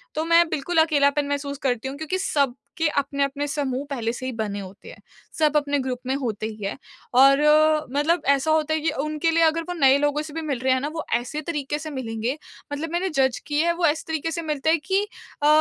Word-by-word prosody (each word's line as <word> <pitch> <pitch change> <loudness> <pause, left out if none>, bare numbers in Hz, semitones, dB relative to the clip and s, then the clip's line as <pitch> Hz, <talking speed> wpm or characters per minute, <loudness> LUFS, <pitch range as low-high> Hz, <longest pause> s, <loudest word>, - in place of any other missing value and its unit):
तो 315 +1 -1
मैं 335 0 +5
बिल्कुल 315 +3 -2
अकेलापन 285 -2 +2
महसूस 285 0 -3
करती 250 -1 0
हूँ 275 +1 -6
क्योंकि 315 +4 -2
सबके 285 0 -1
अपने-अपने 280 0 -1
समूह 280 -2 -2
पहले 230 -4 -2
से 255 +1 -6
ही 260 - -2
बने 210 -2 -3
होते 195 +1 -10
हैं। - - -13 0.4
सब 305 -1 +3
अपने 285 -1 0
ग्रुप 255 -1 -3
में 265 - 0
होते 225 -6 -3
ही 215 -2 -8
हैं 200 - -3 0.4
और 275 +1 +7 0.5
मतलब 320 +4 +2
ऐसा 280 +3 +3
होता 315 0 +2
है 315 - +1
कि 320 - +1
उनके 305 +2 0
लिए 330 0 +3
अगर 325 +1 +3
वो - - -1
नए 270 0 +6
लोगों 290 +1 +1
से 305 -1 -9
भी 325 - -3
मिल 280 -6 -2
रहे 260 0 +2
हैं 260 - +1
ना 290 - -2
वो 320 - -3
ऐसे 265 +6 -3
तरीके 295 -2 -3
से 310 0 -6
मिलेंगे, 245 0 -3 0.4
मतलब 315 +3 -4
मैंने 365 +2 0
जज़ 265 -5 +1
किए 300 +2 +1
है 340 - +2
वो 345 -1 +1
ऐसे 305 +1 +1
तरीके 320 0 -2
से 335 - -3
मिलते 305 -1 -1
है 330 - +4
कि 385 +6 0 0.4
अ, - - +5
290 Hz, 230 wpm, -24 LUFS, 265-315 Hz, 0.5 s, और